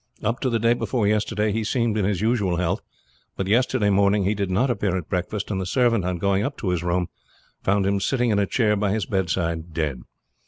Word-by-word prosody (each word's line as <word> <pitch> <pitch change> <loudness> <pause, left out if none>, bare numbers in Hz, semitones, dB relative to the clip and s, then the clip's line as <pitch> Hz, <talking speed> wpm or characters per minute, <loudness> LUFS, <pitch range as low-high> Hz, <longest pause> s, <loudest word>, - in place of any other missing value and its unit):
Up 115 +4 0
to 130 - 0
the 115 - +1
day 115 +1 +3
before 120 -2 -1
yesterday 105 0 +1
he 110 +2 -1
seemed 115 -1 0
in 105 -3 +1
his 100 -2 0
usual 105 -5 +1
health; 90 +3 -1 0.6
but 95 - -1
yesterday 115 0 +2
morning 100 +1 +3
he 100 +3 +1
did 100 -2 -2
not 120 +8 +2
appear 100 -6 0
at 90 - -6
breakfast, 95 +4 -2
and 95 -2 -1
the - - -3
servant 115 -2 +2
on 90 -1 -1
going 100 +2 +1
up 140 +1 -3
to 95 - -3
his 90 -2 -1
room, 90 0 0 0.5
found 100 0 +1
him 100 0 +1
sitting 120 +3 +1
in 100 - +2
a 100 - +1
chair 105 -2 +2
by 100 -1 0
his 105 -1 -1
bedside 85 -4 -2
dead. 75 -7 -2
100 Hz, 230 wpm, -23 LUFS, 95-110 Hz, 0.6 s, day